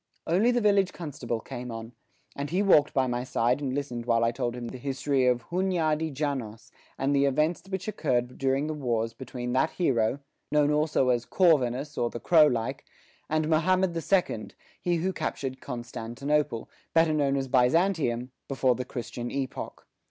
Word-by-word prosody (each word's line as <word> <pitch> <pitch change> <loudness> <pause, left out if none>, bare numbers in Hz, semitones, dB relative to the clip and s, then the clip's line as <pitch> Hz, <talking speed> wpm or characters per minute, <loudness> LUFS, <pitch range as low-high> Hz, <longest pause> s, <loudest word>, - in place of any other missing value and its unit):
Only 190 +8 +3
the 245 -1 +2
village 200 -3 +3
constable 140 -8 -4
came 125 0 -7
on, 115 0 -7 0.4
and 140 +1 -4
he 185 +4 +1
walked 150 -7 +5
by 135 -1 +2
my 120 -1 -2
side 125 +2 +1
and 135 -2 -2
listened 125 -4 -4
while 115 -1 +3
I 115 - +3
told 120 -1 -2
him 120 -1 -5
the 130 - -8
history 135 0 0
of 125 -1 +2
Hunyadi 165 -4 0
Janos 125 -5 -4 0.3
and 140 +2 +1
the 140 0 +4
events 150 +5 +1
which 190 0 -4
occurred 125 - -1
during 135 +1 +1
the 155 - -2
wars 115 -6 -1
between 125 0 -5
that 135 +5 +3
hero, 125 -8 +1 0.3
known 150 0 +3
also 150 -3 +2
as 120 -2 +2
Corvinus 145 -5 +2
or 120 - +1
the 120 - -6
crow 155 +5 +6
like, 115 -5 -2 0.5
and 155 0 +1
Mahommed 180 +3 +2
the 165 - -2
second, 160 - 0 0.3
he 175 -1 +1
who 180 +3 -1
captured 130 -6 -4
Constantinople, 125 +2 -2 0.3
better 165 -1 +4
known 140 -2 +1
as 135 -1 -2
Byzantium, 130 -1 +2 0.2
before 135 -2 +2
the 125 +1 -4
Christian 120 -1 -5
epoch. 135 -2 -5
135 Hz, 175 wpm, -27 LUFS, 125-155 Hz, 0.5 s, crow